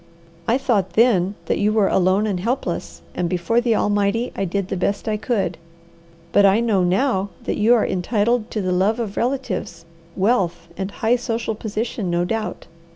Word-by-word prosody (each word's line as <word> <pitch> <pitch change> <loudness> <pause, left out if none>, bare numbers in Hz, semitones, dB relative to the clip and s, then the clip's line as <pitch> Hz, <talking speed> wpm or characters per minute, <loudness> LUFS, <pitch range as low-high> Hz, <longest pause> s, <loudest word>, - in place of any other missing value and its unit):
I 235 - +3
thought 225 -9 0
then 205 -5 +3
that - - 0
you 210 +1 +2
were 215 -2 +3
alone 190 +3 +2
and 200 -4 -1
helpless, 240 +8 -3
and 175 - -1
before 185 +7 +1
the 235 -2 +2
Almighty, 205 +3 +1
I 195 - -1
did 190 +1 -2
the - - -2
best 200 +4 -1
I 215 - +1
could. 220 -3 -1 0.7
But 205 - +5
I 200 +2 +5
know 220 -5 +2
now 195 +2 +1
that - - -2
you 225 +3 +5
are 225 - +2
entitled 215 +5 0
to 215 - -2
the 185 - 0
love 195 +6 +2
of 215 -4 -3
relatives, 255 -8 -2 0.3
wealth, 190 -5 0
and 190 0 -3
high 225 +4 +1
social 230 -2 -2
position, 215 -2 -3
no 175 0 +1
doubt. 220 +3 -3
210 Hz, 180 wpm, -21 LUFS, 190-230 Hz, 0.7 s, But